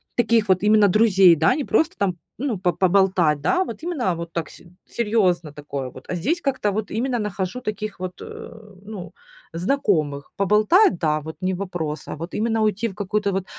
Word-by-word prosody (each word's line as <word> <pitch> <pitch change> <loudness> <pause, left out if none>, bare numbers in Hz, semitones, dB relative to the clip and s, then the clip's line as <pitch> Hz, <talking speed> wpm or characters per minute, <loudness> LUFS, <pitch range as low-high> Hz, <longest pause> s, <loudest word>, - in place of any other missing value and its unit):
таких 230 -3 +2
вот 185 +1 +3
именно 210 -1 +5
друзей, 195 -4 +5
да, 160 +1 +3
не 295 - -3
просто 320 0 +1
там, 195 -3 0 0.2
ну, 245 -6 -1
по 180 -2 0
поболтать, 180 -4 +2
да, 360 - +2
вот 310 -2 -8
именно 265 - -1
вот 170 0 -7
так, 170 -2 -3
с - - -14 0.3
серьёзно 185 -9 0
такое 140 -3 -5
вот. 130 - -13
А - - -2
здесь 295 - -1
как-то 260 -8 0
вот 215 +1 -3
именно 240 +3 -1
нахожу 205 +2 -3
таких 215 -3 -5
вот, 185 -1 -6
э, - - -9 0.4
ну, 200 -5 -8 0.4
знакомых. 165 - 0
Поболтать, 210 - +4
да, 155 -2 0
вот 160 +1 -8
не 185 0 0
вопрос, 175 -5 -4
а - - -5
вот 165 +4 -7
именно 225 0 0
уйти 215 +2 0
в 190 - -9
какое-то 205 0 -1
вот 190 0 -2
195 Hz, 190 wpm, -22 LUFS, 175-220 Hz, 0.4 s, именно